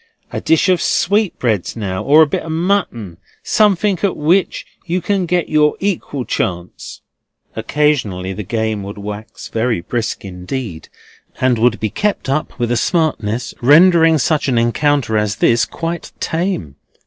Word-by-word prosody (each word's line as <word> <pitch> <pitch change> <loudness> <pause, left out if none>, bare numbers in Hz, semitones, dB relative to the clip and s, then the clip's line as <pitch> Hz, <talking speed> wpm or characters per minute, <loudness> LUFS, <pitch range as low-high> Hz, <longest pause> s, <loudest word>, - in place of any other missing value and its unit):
A - - -3
dish 160 +4 +2
of 185 -2 +2
sweetbreads 175 - 0
now, 95 -5 -3
or 155 +3 +6
a - - +4
bit 145 - -2
of 160 - -6
mutton. 160 - -1 0.3
Something 205 -3 +2
at 200 -3 0
which 170 +5 +1 0.2
you 180 +2 0
can 195 -2 -1
get 175 0 0
your 150 -1 +3
equal 170 -9 -2
chance." 90 -1 -4 0.5
Occasionally 110 -7 0
the 105 - -5
game 110 0 -2
would 100 +2 -7
wax 105 +1 -8
very 115 -4 -1
brisk 115 +3 -3
indeed, 90 0 -6 0.5
and 125 -3 +2
would 115 0 +2
be 110 -2 -2
kept 205 - -1
up 150 +3 -2
with 120 -2 -1
a 120 - +2
smartness 125 - -1
rendering 165 +4 +6
such 150 +1 0
an 125 -3 +1
encounter 120 -1 +1
as 105 -2 -1
this 115 +2 +3
quite 165 0 -5
tame. 160 - -2
130 Hz, 150 wpm, -17 LUFS, 110-165 Hz, 0.5 s, or